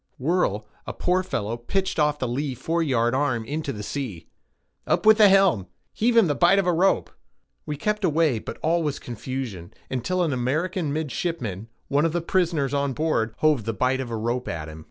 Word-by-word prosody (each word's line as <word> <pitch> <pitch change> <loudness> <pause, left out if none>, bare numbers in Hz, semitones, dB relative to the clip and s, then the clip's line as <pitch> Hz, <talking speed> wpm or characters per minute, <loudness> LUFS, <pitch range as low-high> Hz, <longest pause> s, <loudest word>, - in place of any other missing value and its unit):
Whirl, 130 - 0 0.2
a - - -4
poor 180 +1 +1
fellow 115 - -3
pitched 190 +10 -2
off 150 -1 +2
the 130 - -2
lee 130 +2 -2
foreyard 130 -4 0
arm 130 -4 0
into 150 +2 -3
the 105 -3 -6
sea. 105 - -5 0.6
"Up - - +1
with 220 0 +7
the 210 -2 +8
helm—heave 195 - +1
him 225 - +7
the 150 - +1
bight 175 +6 +4
of 195 - +2
a 180 - +2
rope." 185 +4 +2 0.6
We 150 -1 -3
kept 210 +6 -1
away, 155 -7 +2
but - - -7
all 170 +2 +2
was 150 -3 -1
confusion, 120 -7 -6 0.2
until 180 +9 0
an 160 -5 0
American 155 +6 -1
midshipman, 140 - -3 0.2
one 145 +3 +2
of 165 - 0
the 175 - 0
prisoners 165 -6 0
on 140 -1 0
board, 120 -7 0
hove 150 -8 +3
the 115 - -1
bight 130 +5 +1
of 125 - -5
a 115 - -3
rope 120 +3 -2
at 80 -2 -4
him. 80 0 -9
145 Hz, 195 wpm, -24 LUFS, 120-170 Hz, 0.6 s, the